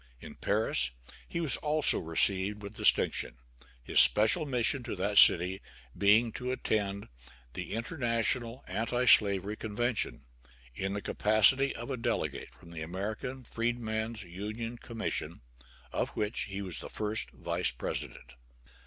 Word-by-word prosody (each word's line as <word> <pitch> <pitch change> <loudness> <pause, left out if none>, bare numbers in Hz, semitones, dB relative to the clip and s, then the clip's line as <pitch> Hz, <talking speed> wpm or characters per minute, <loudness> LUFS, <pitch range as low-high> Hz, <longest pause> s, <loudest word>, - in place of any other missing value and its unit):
In - - -10
Paris 105 - 0 0.4
he 170 - -3
was 160 -4 +3
also 150 0 +2
received 95 +5 0
with 100 +1 -8
distinction, - - +2 0.5
his - - +3
special 130 +10 +6
mission 125 +1 +3
to 120 -3 -5
that 100 +2 +2
city 90 +3 +5 0.3
being 110 +3 +4
to 125 +3 -4
attend 100 -5 -2 0.5
the - - -6
International 115 0 -1
Anti 120 +3 -1
slavery 100 -2 +4
Convention, 110 +2 -2 0.5
in 95 +8 -3
the 100 - -4
capacity 110 +6 +3
of 120 +4 -6
a 130 - -2
delegate 95 - -2
from 85 - -17
the 80 -2 -7
American 105 +10 -5
Freedman's 115 -2 -3
Union 110 +6 -6
Commission, 115 -2 -4 0.5
of - - -1
which 105 +1 +1
he 100 0 -5
was 90 -4 -4
first 105 - -2
vice - - -2
president. - - -6
110 Hz, 130 wpm, -30 LUFS, 100-120 Hz, 0.5 s, special